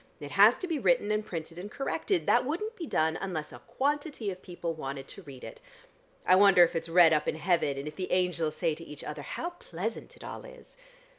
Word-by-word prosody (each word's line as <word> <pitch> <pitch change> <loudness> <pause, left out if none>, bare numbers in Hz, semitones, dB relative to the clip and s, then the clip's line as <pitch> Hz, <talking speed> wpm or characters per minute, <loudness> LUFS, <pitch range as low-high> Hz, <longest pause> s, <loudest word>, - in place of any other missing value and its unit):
It 145 -1 -8
has 205 +8 +6
to 370 - -5
be 325 -4 -1
written 245 -5 +2
and 215 0 +1
printed 165 -4 -6
and 200 +3 -7
corrected. 325 - -1
That 240 - +4
wouldn't 360 - -3
be 335 -6 -6
done 160 -6 +1
unless 170 -6 -4
a - - -10
quantity 285 -6 -2
of 185 0 -9
people 175 -2 -5
wanted 135 -3 -6
to 195 - -10
read 140 -7 -12
it. 470 - -9 0.6
I 185 - +6
wonder 195 -2 +7
if 170 - +1
it's 165 0 -3
read 165 -1 +7
up 150 -1 +1
in - - 0
heaven, 165 -4 +1
and 140 +2 -5
if 150 - -8
the 185 - -4
angels 175 -4 +1
say 165 -2 0
to 165 - -9
each 150 -3 -10
other - - -6
how - - -4
pleasant 220 - -6
it - - -13
all - - -7
is." - - -14
180 Hz, 230 wpm, -29 LUFS, 160-260 Hz, 0.6 s, wonder